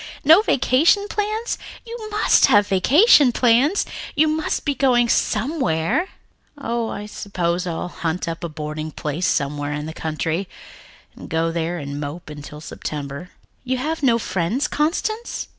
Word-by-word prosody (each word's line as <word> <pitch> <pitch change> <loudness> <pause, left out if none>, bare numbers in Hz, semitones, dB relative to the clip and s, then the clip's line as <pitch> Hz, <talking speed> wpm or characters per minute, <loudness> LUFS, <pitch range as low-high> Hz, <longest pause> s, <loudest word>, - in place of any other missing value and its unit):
No 320 +7 +7
vacation 330 - +3
plans! 430 +3 -2 0.3
You 465 0 -7
must 425 0 +4
have 205 -5 +5
vacation 275 - +5
plans. 250 - +3 0.3
You 310 +2 +4
must 310 0 -2
be 290 - +1
going 250 -3 +3
somewhere." 225 - 0 0.5
"Oh, 235 -4 -2
I 205 - -5
suppose 180 -4 -2
I'll 170 +1 -3
hunt 170 +1 -3
up 165 +1 -5
a 170 - -3
boarding 155 0 -5
place 155 +3 -3
somewhere 145 0 -1
in 150 0 -4
the 160 - -6
country, 160 +4 -3 0.7
and - - -11
go 165 +1 0
there 170 +1 -2
and 140 -2 -5
mope 150 +2 -6
until 150 0 -9
September." 150 +2 -6 0.4
"Have 285 +6 -1
you 275 - +3
no 230 -2 +4
friends, 190 +5 -1
Constance?" 435 +9 -2
195 Hz, 145 wpm, -21 LUFS, -, 0.7 s, No